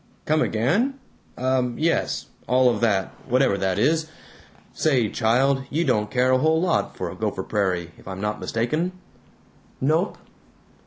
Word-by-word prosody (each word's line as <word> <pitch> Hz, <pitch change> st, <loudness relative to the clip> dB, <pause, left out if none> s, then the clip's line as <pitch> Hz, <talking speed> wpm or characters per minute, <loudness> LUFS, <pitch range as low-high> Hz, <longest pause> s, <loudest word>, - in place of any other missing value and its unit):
"Come 155 Hz, +1 st, +2 dB
again? 200 Hz, -, +1 dB, 0.4 s
Um. 130 Hz, -1 st, 0 dB
Yes. 165 Hz, +2 st, 0 dB, 0.2 s
All 125 Hz, +1 st, +4 dB
of 115 Hz, -, -3 dB
that, 100 Hz, -5 st, +2 dB, 0.2 s
whatever 130 Hz, -4 st, +3 dB
that 95 Hz, -1 st, 0 dB
is.... 155 Hz, +7 st, +2 dB, 0.6 s
Say, 130 Hz, -8 st, +2 dB
child, 130 Hz, +6 st, +2 dB
you 165 Hz, +4 st, 0 dB
don't 105 Hz, -6 st, +1 dB
care 130 Hz, 0 st, +2 dB
a 130 Hz, -, +4 dB
whole 160 Hz, +3 st, +3 dB
lot 175 Hz, -1 st, 0 dB
for -, -, -4 dB
Gopher -, -, -3 dB
Prairie, 90 Hz, -5 st, -1 dB
if -, -, -17 dB
I'm 95 Hz, 0 st, -6 dB
not 105 Hz, +1 st, -2 dB
mistaken." 155 Hz, +11 st, -1 dB, 0.9 s
"Nope." 160 Hz, +8 st, +1 dB
130 Hz, 145 wpm, -24 LUFS, 110-155 Hz, 0.9 s, All